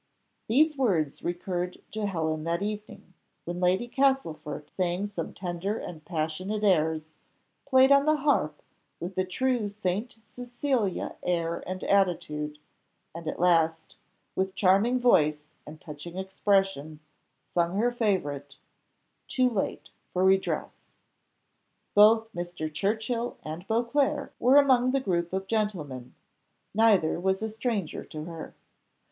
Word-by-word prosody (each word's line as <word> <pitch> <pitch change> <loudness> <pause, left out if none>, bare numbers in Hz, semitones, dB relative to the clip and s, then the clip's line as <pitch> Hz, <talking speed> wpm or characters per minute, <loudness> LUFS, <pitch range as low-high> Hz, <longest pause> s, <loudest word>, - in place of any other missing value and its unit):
These 300 +6 +3
words 180 - 0
recurred 180 +1 -3
to 215 -1 -2
Helen 160 -4 -1
that 170 +3 -1
evening, 210 -3 -6 0.3
when 175 +1 -4
Lady 185 +6 +2
Castlefort 165 - -1
sang 180 +1 0
some 200 -5 -5
tender 185 +3 -3
and 160 -7 -8
passionate 180 +6 -3
airs; 160 -5 +2 0.6
played 260 0 +6
on 280 +1 +5
the 310 - +5
harp 275 - 0 0.4
with 180 +2 -5
a - - +3
true 230 +3 0
Saint 205 +3 -3
Cecilia 245 -4 -2
air 170 -1 -1
and 185 0 -4
attitude; 160 -6 0 0.6
and 165 0 -8
at - - -3
last, 165 -2 +2 0.4
with 190 0 -1
charming 200 +6 +3
voice 155 -11 +3 0.2
and 155 +1 -10
touching 155 +3 -9
expression, 190 -5 0 0.5
sung 175 +2 +1
her 240 +3 +2
favourite 145 - -1 0.7
"Too 255 -1 +2
late 205 -4 -3 0.2
for 185 - +1
redress." 190 0 +1 1.1
Both 220 +2 +5
Mr. 175 -3 -5
Churchill 220 +6 -1
and 160 +5 -7
Beauclerc 275 +6 0
were 255 +3 +5
among 255 -3 +5
the 275 - +3
group 175 -8 -1
of 190 +1 -2
gentlemen; 180 - -3 0.6
neither 205 -7 +3
was 190 +3 0
a 220 - -2
stranger 220 -6 -2
to 155 -1 -7
her. 165 0 -8
190 Hz, 125 wpm, -28 LUFS, 165-225 Hz, 1.1 s, played